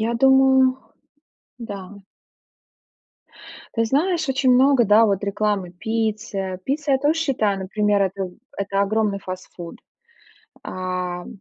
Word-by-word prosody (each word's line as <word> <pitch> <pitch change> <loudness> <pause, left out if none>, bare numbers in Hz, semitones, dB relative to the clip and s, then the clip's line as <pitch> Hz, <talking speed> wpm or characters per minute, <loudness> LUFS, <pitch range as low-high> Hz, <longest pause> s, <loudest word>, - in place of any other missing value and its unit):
Я 225 +2 0
думаю, 265 0 +4 0.8
да. 205 -4 -7 1.9
Ты 230 0 +1
знаешь, 315 +5 0
очень 265 -1 +2
много, 260 -1 +5
да, 215 +2 +5
вот, 200 -1 0
рекламы 200 -2 -1
Пицца. 210 -1 -3
Пицца, 285 +1 -1
я 265 - +3
тоже 305 +4 +1
считаю, 220 -10 0
например, 205 +1 +1
это 190 -1 -2 0.3
это 200 0 -1
огромный 205 0 0
фастфуд. 185 -2 -8 0.9
А, 180 -1 -4
э, - - -12
215 Hz, 115 wpm, -22 LUFS, 195-265 Hz, 1.9 s, много